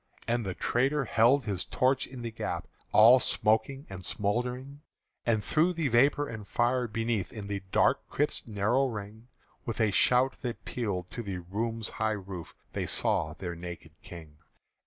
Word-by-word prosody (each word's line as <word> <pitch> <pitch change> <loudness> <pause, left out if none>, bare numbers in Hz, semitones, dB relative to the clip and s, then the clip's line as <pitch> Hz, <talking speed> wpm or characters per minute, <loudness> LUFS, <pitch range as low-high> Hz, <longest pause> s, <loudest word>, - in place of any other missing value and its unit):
And 120 0 +1
the 95 -3 -4
traitor 135 +3 +1
held 120 +5 +4
his 100 -4 -2
torch 130 +1 +1
in 125 -2 -9
the 115 - -4
gap, 110 - -4 0.2
All 115 +4 +8
smoking 120 +6 +1
and 95 -1 -8
smouldering; 125 +8 -2 0.5
And 110 -3 +2
through 165 +4 +2
the 160 -4 0
vapour 140 +5 +3
and 110 -3 -7
fire, 120 +2 +1
beneath 115 -4 -1
In 105 -4 -7
the 100 -1 -3
dark - - +2
crypt's 145 -3 -1
narrow 110 +6 +2
ring, 110 0 -7 0.4
With 115 -1 -4
a 110 -2 +3
shout 125 +7 +3
that 120 -3 -5
pealed 100 -7 -3
to 120 - -4
the 100 -4 -4
room's 110 +5 -2
high 110 0 -1
roof 95 -3 -8 0.2
They - - -2
saw 75 0 +1
their 90 -2 -5
naked 85 -1 -8
King. 80 -4 -11
115 Hz, 165 wpm, -29 LUFS, 100-125 Hz, 0.5 s, All